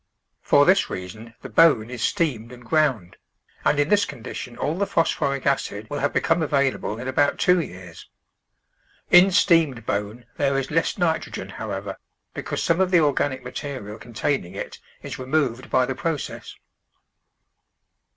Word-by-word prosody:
For 145 Hz, 0 st, +4 dB
this 190 Hz, +2 st, +4 dB
reason 110 Hz, +5 st, -8 dB
the -, -, -6 dB
bone 125 Hz, -9 st, +4 dB
is 125 Hz, -3 st, -6 dB
steamed 125 Hz, -, -1 dB
and 125 Hz, -1 st, -13 dB
ground, 130 Hz, -, 0 dB, 0.5 s
and 150 Hz, -, +2 dB
in 145 Hz, +2 st, +2 dB
this 205 Hz, 0 st, +4 dB
condition 120 Hz, -3 st, -7 dB
all 155 Hz, -, -1 dB
the 200 Hz, +2 st, -1 dB
phos 165 Hz, -, +2 dB
phoric 140 Hz, -2 st, -2 dB
acid 110 Hz, -6 st, -1 dB
will 145 Hz, -, -2 dB
have 145 Hz, -, 0 dB
become 165 Hz, +1 st, +1 dB
available 140 Hz, -7 st, 0 dB
in 125 Hz, +3 st, -6 dB
about 145 Hz, +2 st, +2 dB
two 180 Hz, 0 st, +4 dB
years. 90 Hz, -, -8 dB, 1.0 s
In 180 Hz, +2 st, +8 dB
steamed 165 Hz, -, +3 dB
bone 105 Hz, +4 st, -3 dB
there 140 Hz, -1 st, +1 dB
is 135 Hz, +1 st, -3 dB
less 165 Hz, +1 st, 0 dB
nitrogen, 170 Hz, -3 st, -1 dB
however, -, -, -5 dB, 0.4 s
because -, -, -4 dB
some 170 Hz, +1 st, +2 dB
of 190 Hz, -, +2 dB
the 180 Hz, -2 st, +5 dB
organic 140 Hz, -3 st, 0 dB
material 125 Hz, -5 st, -6 dB
con 120 Hz, 0 st, -13 dB
taining 105 Hz, -6 st, -1 dB
it -, -, -6 dB, 0.2 s
is -, -, -7 dB
removed 130 Hz, -2 st, -1 dB
by 130 Hz, -, +3 dB
the 130 Hz, -, -3 dB
process. 155 Hz, +2 st, -4 dB
140 Hz, 160 wpm, -23 LUFS, 115-160 Hz, 1.0 s, In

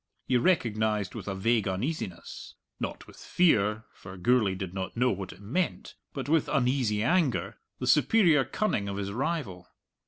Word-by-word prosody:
He 130 Hz, -, +1 dB
recognized 110 Hz, -, +1 dB
with -, -, -8 dB
a 95 Hz, -, -2 dB
vague 110 Hz, +2 st, +1 dB
uneasiness 95 Hz, -, -4 dB, 0.2 s
not -, -, -5 dB
with -, -, -16 dB
fear, 110 Hz, -, +2 dB
for 95 Hz, 0 st, -11 dB
Gourlay 105 Hz, 0 st, +2 dB
did 95 Hz, -1 st, -6 dB
not 95 Hz, +3 st, -5 dB
know 125 Hz, +1 st, +3 dB
what 95 Hz, 0 st, -5 dB
it -, -, -14 dB
meant, 145 Hz, -, -2 dB, 0.2 s
but 135 Hz, -2 st, -5 dB
with 160 Hz, 0 st, +2 dB
uneasy 125 Hz, -6 st, +1 dB
anger 160 Hz, -1 st, +1 dB, 0.2 s
the -, -, -4 dB
superior 170 Hz, -11 st, +4 dB
cunning 115 Hz, -, -1 dB
of 100 Hz, -, -4 dB
his 100 Hz, -1 st, -3 dB
rival. 110 Hz, -, -3 dB
110 Hz, 160 wpm, -28 LUFS, 100-140 Hz, 0.2 s, superior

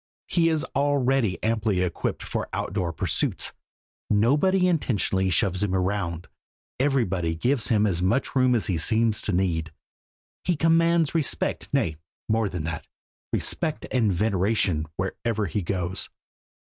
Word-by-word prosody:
He 165 Hz, -2 st, +2 dB
is 160 Hz, -2 st, 0 dB
already 135 Hz, -, +2 dB
amply 110 Hz, -4 st, +1 dB
equipped 90 Hz, -2 st, -2 dB
for -, -, -3 dB
outdoor 90 Hz, -2 st, -2 dB
pursuits. 80 Hz, -, 0 dB, 0.6 s
Nobody 150 Hz, -, +3 dB
intentionally 105 Hz, -, +1 dB
shoves 95 Hz, +2 st, +1 dB
him 100 Hz, -2 st, 0 dB
round; 90 Hz, -3 st, -1 dB, 0.5 s
everybody 95 Hz, -, +1 dB
gives 120 Hz, +7 st, +1 dB
him 110 Hz, -3 st, +3 dB
as 90 Hz, -4 st, +1 dB
much 95 Hz, +12 st, 0 dB
room 130 Hz, -1 st, +4 dB
as 115 Hz, -, 0 dB
he 90 Hz, -4 st, -1 dB
seems 110 Hz, +3 st, +2 dB
to -, -, -2 dB
need. 85 Hz, -4 st, 0 dB, 0.7 s
He 180 Hz, -, +1 dB
commands 165 Hz, 0 st, +3 dB
respect 160 Hz, -4 st, -1 dB
nay, 80 Hz, -3 st, 0 dB, 0.3 s
more 110 Hz, -1 st, +1 dB
than 90 Hz, -4 st, -4 dB
that, 80 Hz, -1 st, -5 dB, 0.4 s
respect 155 Hz, -1 st, -1 dB
and 115 Hz, -5 st, +2 dB
veneration 95 Hz, -4 st, +1 dB
wherever 105 Hz, +3 st, -2 dB
he 100 Hz, +3 st, -2 dB
goes. 90 Hz, 0 st, -2 dB
105 Hz, 135 wpm, -25 LUFS, 90-135 Hz, 0.7 s, room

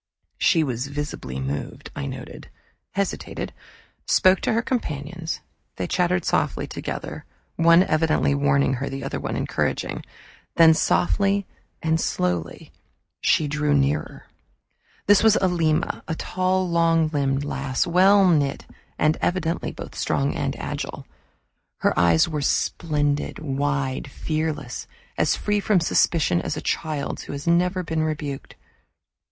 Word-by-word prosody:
She 165 Hz, -4 st, +4 dB
was 130 Hz, -2 st, -2 dB
visibly 140 Hz, -, -5 dB
moved, 70 Hz, +2 st, -5 dB
I 70 Hz, -, -4 dB
noted, -, -, -8 dB, 0.4 s
hesitated, 200 Hz, 0 st, -3 dB, 0.5 s
spoke 185 Hz, 0 st, +5 dB
to -, -, +1 dB
her 230 Hz, +2 st, +1 dB
companions. 165 Hz, -, -3 dB, 0.3 s
They 90 Hz, -, -3 dB
chattered 180 Hz, -, +1 dB
softly -, -, 0 dB
together, -, -, -6 dB, 0.3 s
one 170 Hz, +2 st, +6 dB
evidently 155 Hz, -4 st, +2 dB
warning 140 Hz, -1 st, +2 dB
her, 135 Hz, +2 st, -3 dB
the 135 Hz, 0 st, -5 dB
other -, -, -3 dB
encouraging. -, -, -2 dB, 0.5 s
Then, 165 Hz, -1 st, +7 dB
softly 195 Hz, +4 st, +2 dB, 0.4 s
and 160 Hz, 0 st, +1 dB
slowly, 85 Hz, -2 st, -2 dB, 0.5 s
she 155 Hz, -, +2 dB
drew 150 Hz, 0 st, +1 dB
nearer. 140 Hz, +2 st, 0 dB, 0.8 s
This 205 Hz, -1 st, +6 dB
was 220 Hz, -1 st, +5 dB
Alima, 170 Hz, -3 st, +1 dB
a 160 Hz, -, -2 dB
tall 185 Hz, +2 st, 0 dB
long 165 Hz, -2 st, +3 dB
limbed 140 Hz, -2 st, 0 dB
lass, 135 Hz, 0 st, -1 dB
well 190 Hz, +3 st, +5 dB
knit 145 Hz, -5 st, +1 dB, 0.3 s
and 155 Hz, +1 st, +2 dB
evidently 175 Hz, -2 st, -1 dB
both -, -, -9 dB
strong 70 Hz, -1 st, 0 dB
and -, -, -2 dB
agile. -, -, -5 dB, 0.7 s
Her -, -, +2 dB
eyes 85 Hz, -2 st, +4 dB
were 150 Hz, -3 st, -3 dB
splendid, 145 Hz, 0 st, 0 dB
wide, 140 Hz, -1 st, -2 dB
fearless, 155 Hz, +2 st, -3 dB, 0.3 s
as -, -, +2 dB
free 210 Hz, 0 st, 0 dB
from 200 Hz, -1 st, +3 dB
suspicion 160 Hz, -, +2 dB
as -, -, -3 dB
a -, -, -4 dB
child's 150 Hz, -3 st, -3 dB
who -, -, -6 dB
has 140 Hz, 0 st, -6 dB
never 180 Hz, +2 st, +2 dB
been 160 Hz, -1 st, -1 dB
rebuked. 150 Hz, -3 st, -4 dB
155 Hz, 130 wpm, -24 LUFS, 140-175 Hz, 0.8 s, Then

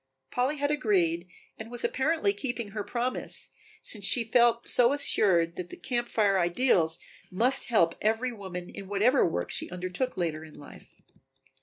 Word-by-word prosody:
Polly 260 Hz, +5 st, 0 dB
had 285 Hz, +1 st, 0 dB
agreed 180 Hz, -, +1 dB, 0.3 s
and 220 Hz, +1 st, -7 dB
was 240 Hz, 0 st, -4 dB
apparently 320 Hz, +8 st, +1 dB
keeping 245 Hz, -, -4 dB
her 210 Hz, +1 st, -4 dB
promise, 240 Hz, +4 st, -3 dB, 0.3 s
since 210 Hz, -3 st, -2 dB
she 230 Hz, +4 st, +4 dB
felt 235 Hz, 0 st, +3 dB
so 245 Hz, +2 st, +5 dB
assured 175 Hz, -11 st, +2 dB
that 180 Hz, -1 st, -5 dB
the -, -, -9 dB
Camp 240 Hz, -1 st, -2 dB
Fire 200 Hz, -3 st, +2 dB
ideals 175 Hz, -2 st, +2 dB, 0.3 s
must 245 Hz, +8 st, +1 dB
help 170 Hz, -8 st, +3 dB
every 225 Hz, +4 st, 0 dB
woman 190 Hz, -5 st, -7 dB
in 195 Hz, -, -9 dB
whatever 215 Hz, +7 st, +3 dB
work 90 Hz, -, -1 dB
she -, -, -3 dB
undertook 185 Hz, +7 st, -4 dB
later 160 Hz, -3 st, -2 dB
in 155 Hz, -1 st, -13 dB
life. 145 Hz, -, -13 dB
215 Hz, 160 wpm, -28 LUFS, 180-250 Hz, 0.3 s, so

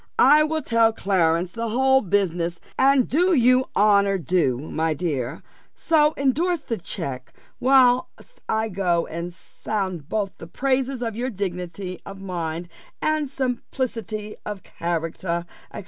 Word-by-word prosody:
I 295 Hz, +3 st, +7 dB
will 310 Hz, 0 st, 0 dB
tell 230 Hz, -1 st, +3 dB
Clarence 180 Hz, -4 st, +1 dB
the 230 Hz, +2 st, -3 dB
whole 265 Hz, +3 st, +4 dB
business, 175 Hz, -4 st, 0 dB, 0.2 s
and 270 Hz, -1 st, +4 dB
do 350 Hz, +5 st, +3 dB
you 255 Hz, 0 st, +4 dB
honour 200 Hz, -1 st, +4 dB
due, 165 Hz, -7 st, +1 dB
my 155 Hz, +3 st, -2 dB
dear: 140 Hz, -4 st, -3 dB, 0.3 s
so 305 Hz, -2 st, +3 dB
endorse 315 Hz, +5 st, +1 dB
the 230 Hz, -7 st, -4 dB
check, 140 Hz, -8 st, -6 dB, 0.3 s
whilst 255 Hz, -, +2 dB
I 220 Hz, 0 st, +1 dB
go 180 Hz, -3 st, +1 dB
and 170 Hz, +2 st, -5 dB
sound 185 Hz, -3 st, -5 dB
both 205 Hz, -3 st, -1 dB
the 165 Hz, -, -9 dB
praises 260 Hz, +4 st, -1 dB
of 225 Hz, -2 st, -3 dB
your 245 Hz, +3 st, -2 dB
dignity 180 Hz, -3 st, -5 dB
of 195 Hz, -1 st, -9 dB
mind, 175 Hz, -3 st, -4 dB, 0.3 s
and 310 Hz, -2 st, 0 dB
simplicity 240 Hz, -5 st, -3 dB
of 205 Hz, -2 st, -6 dB
character, 170 Hz, +1 st, -3 dB, 0.3 s
&c. -, -, -7 dB
205 Hz, 135 wpm, -23 LUFS, 175-260 Hz, 0.3 s, I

